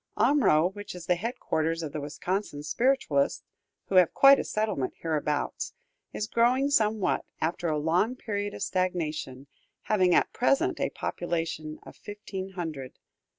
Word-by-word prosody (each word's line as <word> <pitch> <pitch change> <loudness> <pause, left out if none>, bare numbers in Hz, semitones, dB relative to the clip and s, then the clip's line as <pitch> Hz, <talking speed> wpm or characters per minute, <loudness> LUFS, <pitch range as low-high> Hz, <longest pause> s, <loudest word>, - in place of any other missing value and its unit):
Omro, 190 - +4
which 205 -1 -8
is 175 -2 -8
the 180 - +3
headquarters 170 -6 -2
of 150 - -4
the 150 - -3
Wisconsin 150 +1 -3
Spiritualists, 160 - +1 0.4
who 190 - +1
have 180 -3 +5
quite 275 0 +8
a - - -1
settlement 215 -12 -2
hereabouts, 150 -2 -2 0.4
is 210 - -3
growing 250 +5 +2
somewhat, 215 -5 +2 0.2
after 170 +2 -1
a 155 -2 0
long 175 +11 +1
period 205 -4 -4
of - - -4
stagnation, 160 -8 -2 0.4
having 185 -5 +3
at - - +2
present 320 +8 +1
a - - 0
population 165 -3 -3
of - - -12
fifteen 195 -2 -7
hundred. 155 -8 -6
180 Hz, 145 wpm, -28 LUFS, 155-215 Hz, 0.4 s, quite